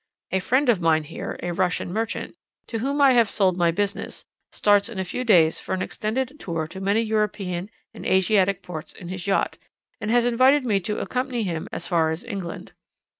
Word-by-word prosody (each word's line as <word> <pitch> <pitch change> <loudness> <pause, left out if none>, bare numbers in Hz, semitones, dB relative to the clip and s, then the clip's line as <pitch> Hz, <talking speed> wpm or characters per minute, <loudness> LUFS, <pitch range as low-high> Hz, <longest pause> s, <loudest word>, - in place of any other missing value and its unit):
A 190 - +2
friend 260 +9 +2
of 220 -7 +3
mine 160 -1 +3
here, 160 +2 -6
a 175 0 -2
Russian 180 0 -1
merchant, 225 +2 -3 0.3
to 225 - -4
whom 280 +5 -1
I 280 -2 +7
have 235 -4 +4
sold 190 -4 +2
my 175 -1 +3
business, 200 +4 -3 0.3
starts 205 +1 +3
in 225 - -8
a 190 - -1
few 250 - -3
days 170 -9 +4
for - - -3
an 185 - -2
extended 260 +6 -3
tour 165 -3 -3
to 190 - -8
many 200 +3 +2
European 205 -4 -1 0.2
and - - -10
Asiatic 190 0 +2
ports 160 -3 -7
in 175 -3 -10
his 185 +1 -5
yacht, 195 - 0 0.4
and 215 - -3
has 240 +1 +4
invited 255 +3 +4
me 205 -5 +2
to 210 +3 -3
accompany 250 -2 -2
him 170 -5 -3
as - - -4
far 165 -3 +2
as 160 +5 -4
England. 195 -8 -6
200 Hz, 200 wpm, -24 LUFS, 175-230 Hz, 0.4 s, I